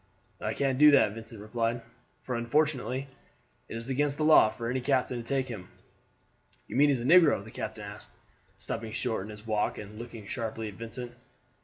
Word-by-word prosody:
"I - - -2
can't 135 -2 0
do 150 0 +9
that," 140 -7 +5
Vincent 115 0 -9
replied; 115 +3 -1 0.4
"for 125 - -4
unfortunately 130 +1 0 0.6
it - - -5
is 115 +1 -6
against 140 +2 0
the 155 - 0
law 155 -8 +7
for 115 +1 -5
any 130 +2 -1
captain 130 -1 +1
to 120 - -5
take 130 +2 0
him." 100 -7 -7 1.0
"You - - -7
mean 145 +3 +5
he - - +4
is 125 - -1
a - - -4
negro?" 155 - +6
the 110 - -12
captain 110 -1 -5
asked, 100 0 -8 0.5
stopping 110 -1 -5
short 115 -5 -2
in - - -10
his 105 0 -10
walk 110 -2 0
and 105 +1 -9
looking 115 -3 -8
sharply 110 0 -4
at - - -10
Vincent. 115 +3 -6
120 Hz, 195 wpm, -29 LUFS, 110-135 Hz, 1.0 s, do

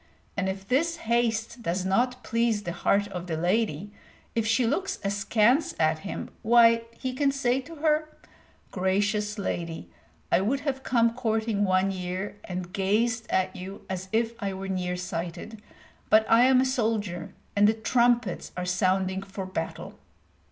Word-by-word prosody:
And 190 -1 0
if 190 0 -5
this 330 +8 +2
haste 235 -2 0
does 180 -2 -1
not 250 +6 +1
please 230 -2 +1
the 175 - -3
heart 200 +3 +1
of 180 -2 -6
the 160 -2 -2
lady, 190 +1 0 0.4
if 225 -1 0
she 225 +3 +3
looks 380 +11 -1
askance 210 +8 +2
at 155 0 +2
him, 195 - -6
why, 230 0 +5
he 260 -1 -3
can 275 +2 +2
say 265 -1 +1
to 330 +5 -11
her, 310 0 +1 0.6
"Gracious 205 +3 0
lady, 170 -4 -4 0.4
I - - +4
would 260 +8 0
have 275 -2 -2
come 230 -3 +2
courting 220 -3 0
one 185 +1 +2
year, 185 +2 -4
and 180 0 -5
gazed 225 +4 0
at 185 +1 0
you 190 +2 -8
as 190 0 -4
if 225 +1 +1
I 200 -1 -2
were 195 +1 -5
near 180 -1 -2
sighted; 180 +5 -5 0.5
but 220 +1 +6
I 230 +2 +6
am 260 0 +5
a - - +2
soldier, 215 -9 -1 0.2
and 205 0 +5
the 220 - +3
trumpets 235 -2 +1
are 180 - -2
sounding 185 +1 +1
for 195 0 -6
battle!" 185 +1 -5
210 Hz, 160 wpm, -27 LUFS, 190-235 Hz, 0.6 s, but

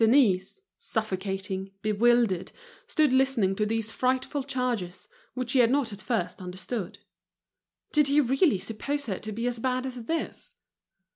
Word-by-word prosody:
Denise, 225 - +3 0.2
suffocating, 195 - -3
bewildered, 215 -3 +3 0.4
stood 310 - +3
listening 260 -8 +3
to 210 +1 0
these 225 0 -1
frightful 260 +3 0
charges, 240 -9 -2 0.3
which 250 -2 -2
she 260 - +3
had 235 -2 +6
not 260 -4 +1
at 205 - -8
first 230 -4 -2
understood. 185 +2 -5 0.9
Did 300 -2 +4
he 285 +2 +4
really 270 - +3
suppose 230 +9 -3
her 195 -6 -3
to 215 - -6
be 230 +3 -3
as 245 -1 -1
bad 255 +1 0
as 250 -3 -6
this? 325 +6 -4
235 Hz, 145 wpm, -28 LUFS, 200-265 Hz, 0.9 s, had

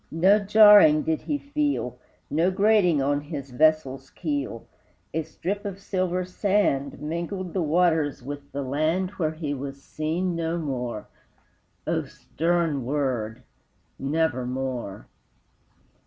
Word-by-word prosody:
No 190 +6 +4
jarring 205 -7 +7
did 160 -1 -1
he 295 - -2
feel, 290 0 -2 0.3
No 165 +4 +2
grating 190 -6 +3
on 145 +1 +1
his 145 -3 -7
vessel's 135 -2 +1
keel, 145 -8 -4 0.5
A 160 - 0
strip 180 +6 -4
of 195 -1 -5
silver 185 -2 -1
sand 185 -7 0
Mingled 170 +4 -4
the 190 - 0
waters 160 -4 +1
with 140 +1 -8
the 140 +1 -3
land 155 +8 0
Where 160 -6 -2
he 155 -2 -3
was 140 0 -7
seen 170 +4 -2
no 165 0 -1
more: 125 -8 -4 0.8
O - - -1
stern 165 -4 -1
word 125 -4 -2 0.6
Nevermore! 130 -7 -2
155 Hz, 120 wpm, -25 LUFS, 140-185 Hz, 0.8 s, jarring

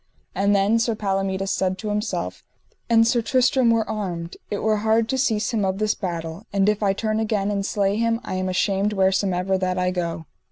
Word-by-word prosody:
And 200 +1 +2
then 200 +3 +3
Sir 230 -1 0
Palomides 195 -1 -1
said 185 0 0
to 210 +2 -5
himself: 210 +2 -3 0.5
An 225 -1 +6
Sir 235 +1 +2
Tristram 255 0 +2
were 230 -1 +2
armed, 180 -6 -4
it 205 - -3
were 215 0 +2
hard 220 +1 +2
to 265 - 0
cease 225 -4 0
him 215 -3 +1
of 190 0 0
this 215 0 +1
battle, 170 +1 -5
and 195 0 +2
if 210 0 +1
I 200 -2 +3
turn 215 +2 -1
again 210 -2 0
and 200 -1 -1
slay 200 0 0
him 230 0 +1
I - - -5
am 185 0 -1
ashamed 195 +2 +1
wheresomever 190 -1 +1
that 185 -1 -1
I 180 0 +1
go. 170 -2 -3
200 Hz, 205 wpm, -23 LUFS, 190-220 Hz, 0.5 s, An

